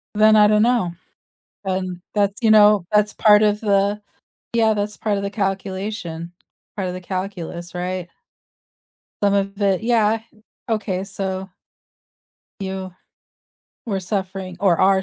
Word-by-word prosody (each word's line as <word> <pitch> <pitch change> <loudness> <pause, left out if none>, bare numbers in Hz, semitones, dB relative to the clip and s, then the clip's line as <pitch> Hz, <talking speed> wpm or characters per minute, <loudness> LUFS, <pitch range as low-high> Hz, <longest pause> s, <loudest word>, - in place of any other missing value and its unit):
Then 215 +1 +6
I 210 -1 +7
don't 210 0 +4
know, 230 -8 +1 0.7
and 185 -2 -3
that's 200 +1 +1
you 225 - +3
know, 210 -3 +6
that's 210 0 +3
part 210 0 +5
of 210 0 +2
the 205 0 +1 0.5
yeah, 220 -2 +3
that's 205 0 -3
part 210 -2 -1
of 200 - -3
the 200 - -3
calculation, 190 -3 -3 0.4
part 190 -3 -2
of 180 - -4
the 185 - -7
calculus, 180 -2 -5
right. 180 0 -3 1.2
Some 200 0 +3
of 195 +1 -2
it 195 0 +2
yeah, 225 -2 +2 0.5
okay, 205 -4 -1
so 190 -1 -4 1.1
You 190 -1 -5 0.9
we're 200 -5 -2
suffering 190 -1 -4
or 180 -5 +3
are 190 0 +4
195 Hz, 135 wpm, -21 LUFS, 185-210 Hz, 1.2 s, I